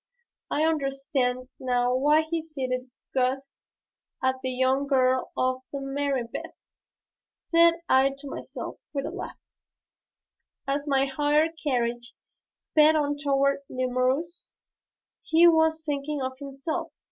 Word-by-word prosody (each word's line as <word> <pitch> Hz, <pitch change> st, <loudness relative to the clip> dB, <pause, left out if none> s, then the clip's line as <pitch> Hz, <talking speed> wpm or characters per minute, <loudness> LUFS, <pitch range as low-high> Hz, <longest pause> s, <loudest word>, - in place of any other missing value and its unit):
"I 305 Hz, +2 st, +1 dB
understand 275 Hz, -4 st, -1 dB
now 245 Hz, -1 st, +1 dB
why 295 Hz, +4 st, +4 dB
he 325 Hz, +1 st, -2 dB
cited 260 Hz, -5 st, -4 dB, 0.2 s
Goethe 260 Hz, +1 st, +1 dB, 0.8 s
and 260 Hz, 0 st, +3 dB
the 260 Hz, -, -2 dB
young 260 Hz, +2 st, +1 dB
girl 260 Hz, -2 st, +2 dB
of 255 Hz, 0 st, 0 dB
Marienbad," 275 Hz, -3 st, -3 dB, 0.8 s
said 335 Hz, 0 st, +4 dB
I 265 Hz, +1 st, +5 dB
to 280 Hz, +1 st, -9 dB
myself -, -, -7 dB
with 275 Hz, -1 st, -2 dB
a -, -, -4 dB
laugh, -, -, -7 dB, 1.3 s
as 285 Hz, +2 st, -1 dB
my 275 Hz, -1 st, +3 dB
hired 295 Hz, +3 st, +2 dB
carriage 240 Hz, -3 st, -1 dB, 0.4 s
sped 310 Hz, 0 st, +3 dB
on 290 Hz, -1 st, +1 dB
toward 275 Hz, -1 st, +1 dB
Nemours. 255 Hz, +6 st, -1 dB, 0.7 s
"He 330 Hz, +2 st, +5 dB
was 320 Hz, -1 st, +3 dB
thinking 290 Hz, -1 st, -2 dB
of 260 Hz, 0 st, -3 dB
himself. 275 Hz, +2 st, -4 dB
275 Hz, 115 wpm, -26 LUFS, 255-300 Hz, 1.3 s, I